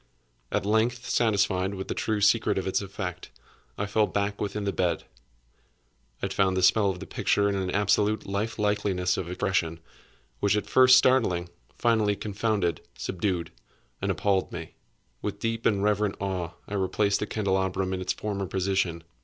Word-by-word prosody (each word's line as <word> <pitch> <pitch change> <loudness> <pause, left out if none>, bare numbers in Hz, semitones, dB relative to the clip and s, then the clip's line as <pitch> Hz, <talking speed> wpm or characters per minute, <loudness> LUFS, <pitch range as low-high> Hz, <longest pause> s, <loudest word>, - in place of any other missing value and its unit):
At - - 0
length, 115 +3 +1
satisfied 100 -4 +1
with 95 0 -5
the - - -2
true 110 -2 -1
secret 105 0 +3
of 95 - -1
its 95 - 0
effect, 95 -2 -6 0.5
I 100 - -1
fell 105 +1 +2
back 100 0 -2
within 105 0 -2
the 100 -1 -1
bed. 90 -2 0 1.2
I - - +3
had - - -3
found 95 -1 +2
the 95 - +1
spell 100 +1 +5
of 90 -2 -3
the - - -7
picture 100 0 +1
in 100 - +1
an 95 -2 -1
absolute 105 +2 +1
life 100 +3 -2
likeliness 100 -3 +1
of 85 - -4
expression, 90 -3 -1 0.6
which, 100 +1 +2
at 105 - -2
first 130 0 +7
startling, 110 -10 +3 0.3
finally 110 -4 +2
confounded, 100 -4 -1 0.2
subdued, 90 -3 -2 0.5
and - - -1
appalled 100 -2 +1
me. 80 -2 -7 0.5
With - - -3
deep 115 0 -1
and 100 -2 +1
reverent 105 -1 +1
awe 95 -3 -3
I - - -7
replaced 100 +1 +1
the 105 - -2
candelabrum 95 -2 0
in 95 - -3
its 90 - 0
former 100 -2 -3
position. 95 -3 -1
100 Hz, 170 wpm, -27 LUFS, 95-105 Hz, 1.2 s, first